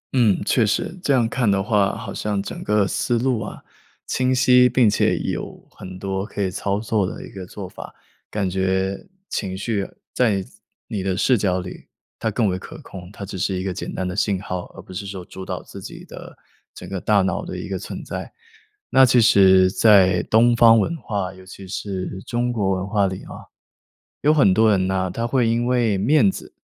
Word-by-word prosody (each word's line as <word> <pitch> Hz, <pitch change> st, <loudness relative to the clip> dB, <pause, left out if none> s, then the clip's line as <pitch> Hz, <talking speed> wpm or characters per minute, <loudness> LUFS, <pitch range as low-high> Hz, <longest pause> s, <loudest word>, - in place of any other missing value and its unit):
嗯， 115 Hz, -6 st, +4 dB
确 120 Hz, -, +3 dB
实， 110 Hz, -, -1 dB
这 140 Hz, -, +1 dB
样 120 Hz, -4 st, +3 dB
看 115 Hz, -2 st, 0 dB
的 100 Hz, -1 st, +2 dB
话， 105 Hz, -3 st, +1 dB
好 -, -, -7 dB
像 105 Hz, -2 st, -2 dB
整 -, -, -7 dB
个 105 Hz, -1 st, +2 dB
思 120 Hz, +4 st, 0 dB
路 125 Hz, -1 st, 0 dB
啊， 105 Hz, -, -7 dB, 0.4 s
清 130 Hz, 0 st, 0 dB
晰、 125 Hz, 0 st, +5 dB
并 125 Hz, -4 st, +4 dB
且 105 Hz, -, +2 dB
有 -, -, -5 dB
很 95 Hz, 0 st, -10 dB
多 95 Hz, 0 st, -3 dB
可 105 Hz, -, -9 dB
以 95 Hz, -, -1 dB
操 100 Hz, +1 st, -2 dB
作 105 Hz, -3 st, 0 dB
的 -, -, -7 dB
一 -, -, -12 dB
个 95 Hz, -2 st, -8 dB
做 95 Hz, -2 st, -8 dB
法， -, -, -10 dB, 0.4 s
感 100 Hz, -3 st, -1 dB
觉 95 Hz, -, -1 dB, 0.2 s
情 95 Hz, 0 st, -3 dB
绪 100 Hz, -1 st, -1 dB, 0.3 s
在 105 Hz, -6 st, +1 dB, 0.4 s
你 105 Hz, -, -3 dB
的 95 Hz, 0 st, -1 dB
视 130 Hz, -, +3 dB
角 95 Hz, -3 st, 0 dB
里 90 Hz, -, -10 dB, 0.3 s
它 110 Hz, -, -1 dB
更 110 Hz, 0 st, +1 dB
为 95 Hz, 0 st, -1 dB
可 160 Hz, 0 st, -10 dB
控， 90 Hz, -4 st, -10 dB
它 100 Hz, -, -8 dB
只 95 Hz, -1 st, -7 dB
是 95 Hz, +1 st, -1 dB
一 -, -, -3 dB
个 95 Hz, -1 st, -2 dB
简 -, -, -5 dB
单 95 Hz, -, -3 dB
的 90 Hz, -, -4 dB
信 100 Hz, -2 st, 0 dB
号， 90 Hz, -2 st, -5 dB
而 -, -, -10 dB
不 95 Hz, -, -12 dB
是 100 Hz, +2 st, -5 dB
说 95 Hz, -2 st, -7 dB
主 95 Hz, -, -9 dB
导 -, -, -5 dB
自 -, -, -11 dB
己 -, -, -10 dB
的 -, -, -11 dB, 0.4 s
整 -, -, -9 dB
个 95 Hz, -2 st, -5 dB
大 100 Hz, -3 st, +3 dB
脑 95 Hz, -, -1 dB
的 -, -, -6 dB
一 -, -, -6 dB
个 -, -, -3 dB
存 -, -, -7 dB
在。 -, -, -6 dB, 0.6 s
那 135 Hz, -, +6 dB
其 125 Hz, 0 st, +4 dB
实 95 Hz, -4 st, +6 dB
在 95 Hz, -5 st, +5 dB
东 120 Hz, +2 st, +5 dB
方 115 Hz, -1 st, +7 dB
文 165 Hz, +10 st, 0 dB
化， 100 Hz, -7 st, -3 dB
尤 95 Hz, 0 st, -14 dB
其 95 Hz, 0 st, -11 dB
是 95 Hz, -1 st, -5 dB
中 120 Hz, 0 st, -1 dB
国 100 Hz, -4 st, 0 dB
文 95 Hz, +1 st, -4 dB
化 100 Hz, -2 st, +2 dB
里 95 Hz, 0 st, -6 dB
啊， -, -, -11 dB, 0.7 s
有 150 Hz, +1 st, +4 dB
很 105 Hz, -11 st, +4 dB
多 110 Hz, +2 st, +4 dB
人 95 Hz, -2 st, +2 dB
呢， 95 Hz, -1 st, -1 dB
他 115 Hz, +4 st, -2 dB
会 120 Hz, -2 st, +2 dB
因 115 Hz, +1 st, +1 dB
为 120 Hz, -5 st, +2 dB
面 110 Hz, -1 st, +4 dB
子， -, -, -10 dB
100 Hz, 230 characters per minute, -22 LUFS, 95-115 Hz, 0.7 s, 方